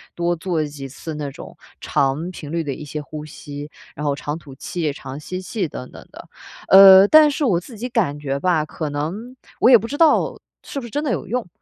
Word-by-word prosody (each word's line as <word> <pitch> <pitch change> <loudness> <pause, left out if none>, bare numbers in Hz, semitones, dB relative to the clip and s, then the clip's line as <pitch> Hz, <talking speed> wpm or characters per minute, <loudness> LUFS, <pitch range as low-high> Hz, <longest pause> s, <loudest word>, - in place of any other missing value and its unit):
多 175 0 0
做 170 -1 -2
几 145 -2 -8
次 155 +4 -8
那 150 -2 -4
种 - - -11 0.2
长 145 +6 -1
频 150 -4 -9
率 165 0 -1
的 140 -3 -3
一 150 - -9
些 150 +1 -6
呼 150 +1 -8
吸， 145 -1 -9 0.3
然 150 - -6
后 145 -1 +1
长 145 +1 -4
吐 140 -5 -13
气、 160 +2 -3
长 135 0 -8
吸 185 +4 -6
气， 190 -1 -3
等 130 -3 -9
等 - - -13
的。 - - -12 0.4
呃， 195 0 +9
但 310 +4 +7
是 290 0 -1
我 190 -9 +2
自 220 +6 -12
己 245 +4 -4
感 200 - -1
觉 140 -1 -3
吧， 165 -2 +1
可 155 0 -5
能 180 - -5 0.2
我 - - +5
也 250 - +9
不 230 +2 -6
知 285 - -5
道 320 -1 +3 0.2
是 280 - -6
不 250 - -8
是 - - -12
真 290 +7 -2
的 290 - -1
有 210 - -3
用。 240 0 -2
165 Hz, 250 characters per minute, -21 LUFS, 145-210 Hz, 0.4 s, 呃